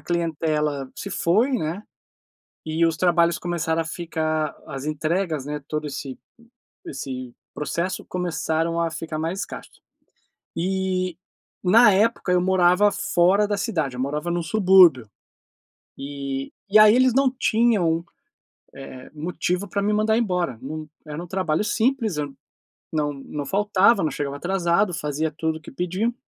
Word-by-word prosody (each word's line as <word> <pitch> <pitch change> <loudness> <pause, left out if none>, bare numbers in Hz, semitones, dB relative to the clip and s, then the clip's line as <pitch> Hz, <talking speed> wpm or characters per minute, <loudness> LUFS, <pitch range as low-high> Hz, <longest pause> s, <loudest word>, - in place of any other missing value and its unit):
clientela 155 -5 -1
se 200 - -6
foi, 210 +11 +2
né, 195 - -2 0.8
e 160 +1 0
os 165 - 0
trabalhos 170 -2 +3
começaram 165 -2 -1
a - - -10
ficar 160 -2 -2
as 135 -2 -6
entregas, 155 0 -1
né, 150 0 -5
todo 150 0 -3
esse 140 -2 -6 0.7
esse 130 -2 -6 0.2
processo 170 +6 -3
começaram 170 -2 -1
a 165 - 0
ficar 160 -1 -5
mais 165 +5 -2
escasso, - - -7 0.9
e, 185 0 -1 0.5
na 210 +4 +6
época, 205 -1 +1
eu 180 - +4
morava 185 +2 +4
fora 195 +2 +2
da 205 0 -1
cidade, 160 - -2
eu - - -7
morava 150 +5 -2
num 175 0 -1
subúrbio, 180 - +5 0.9
e 140 -1 -5 0.2
e 215 - +6
aí 215 +1 +8
eles 255 -1 +4
não 270 0 +4
tinham, 215 -10 +1 0.7
eh, 130 -1 -10
motivo 180 +4 -2
pra 200 - -1
me 210 +1 +1
mandar 215 +1 +2
embora, 180 - -1
num 155 +3 -6 0.2
era 155 +3 -6
um - - -10
trabalho 185 -1 0
simples, 225 - 0
eu 150 - -1
n 135 - -16 0.6
não 150 -1 +1
não 140 +1 -6
faltava, 200 +2 +3
não 155 - 0
chegava 140 -1 -4
atrasado, 180 +3 +1
fazia 150 0 -2
tudo 160 +1 -2
o - - -22
que - - -10
pediam 185 - -1
170 Hz, 145 wpm, -23 LUFS, 150-195 Hz, 0.9 s, aí